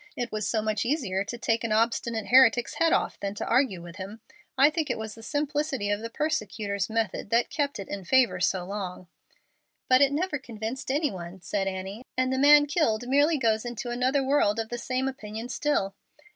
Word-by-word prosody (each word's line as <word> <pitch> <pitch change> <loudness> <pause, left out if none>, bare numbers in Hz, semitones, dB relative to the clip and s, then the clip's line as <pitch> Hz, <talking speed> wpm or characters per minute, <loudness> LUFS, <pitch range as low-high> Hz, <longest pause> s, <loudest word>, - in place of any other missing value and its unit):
It 245 0 -3
was 215 -1 -2
so 220 -2 0
much 215 -1 0
easier 230 -8 -1
to 240 +4 -6
take 230 0 0
an 230 - -2
obstinate 230 0 0
heretic's 245 -2 +5
head 330 0 +4
off - - 0
than 200 0 -4
to - - -4
argue 235 -8 +1
with 175 +1 -10
him! 200 +3 -7 0.4
I 280 +3 +6
think 315 -1 -2
it - - -1
was 220 -1 -6
the 225 - -13
simplicity 290 -4 -1
of 205 - 0
the 230 +1 -6
persecutor's 215 -9 -2
method 220 -3 -2
that 235 +2 +2
kept 285 -3 -1
it 195 - -7
in 200 -1 -5
favor 255 +7 +3
so 185 -2 0
long." 185 -2 -6 0.8
"But 255 +1 +5
it 280 -1 +5
never 300 0 -1
convinced 240 +1 -6
any 290 +1 +1
one," 180 0 -8
said 195 +1 -2
Annie, 195 +4 -5
"and 255 0 +1
the 260 - 0
man 290 +1 +7
killed 245 -7 0
merely 290 +4 +3
goes 220 -4 +1
into 240 0 -5
another 255 +3 +1
world 260 -6 +2
of 225 0 -3
the 240 - -4
same 255 +2 -1
opinion 225 -2 -6
still." 240 -7 0
230 Hz, 205 wpm, -27 LUFS, 205-270 Hz, 0.8 s, man